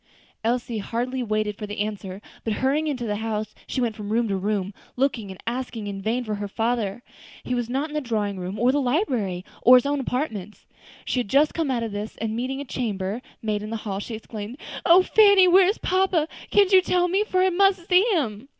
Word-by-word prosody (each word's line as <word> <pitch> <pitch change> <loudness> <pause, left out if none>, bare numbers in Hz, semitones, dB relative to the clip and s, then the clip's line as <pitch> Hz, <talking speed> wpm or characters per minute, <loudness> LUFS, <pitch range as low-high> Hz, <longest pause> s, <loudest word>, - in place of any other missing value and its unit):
Elsie 235 -1 -1
hardly 245 +5 -2
waited 215 -2 -1
for 210 - -6
the 205 0 -6
answer, 200 -2 -4 0.2
but 220 - -1
hurrying 280 +7 +1
into 255 -5 -2
the 210 -2 -1
house, 215 -1 -3 0.2
went 235 -4 0
from 210 -1 -6
room 230 +1 +2
to 195 - 0
room, 200 0 -1 0.2
looking 250 -6 0
and 190 - -9
asking 235 -2 -4
in 200 -1 -5
vain 230 +5 -1
for 215 -2 -3
her 205 0 -3
father. 225 0 -1 0.4
He 250 - -3
was 240 -1 -1
not 275 +5 -1
in - - -10
the 300 - -1
drawing 210 -6 -2
room, 185 +3 -5
or 240 +4 +3
the 290 +1 +1
library, 245 - 0 0.2
or 250 - +8
his 250 - +1
own 285 0 0
apartments. 225 -7 -4 0.4
She 255 - 0
had 245 - -2
just 285 +7 +3
come 325 -4 -1
out 240 -3 0
of 225 - -3
this, 205 +2 -5
and 220 0 -3
meeting 260 +3 -3
a 285 - -5
chamber 210 -4 -3 0.2
maid 210 -1 -1
in 210 - -6
the 225 - -3
hall, 195 -2 -2
she 225 +2 -5
exclaimed, 220 +2 -7 0.3
"O 360 +2 +7
Fanny! 405 -2 +6
where 365 +1 +6
is 405 - +1
papa? 370 -4 +1 0.2
can't 405 -1 +4
you 375 - +8
tell 360 0 +1
me? 385 +4 +2
for 370 -4 0
I 375 - +3
must 380 -1 +2
see 360 -1 +6
him." 245 -4 -2
235 Hz, 225 wpm, -24 LUFS, 210-285 Hz, 0.4 s, or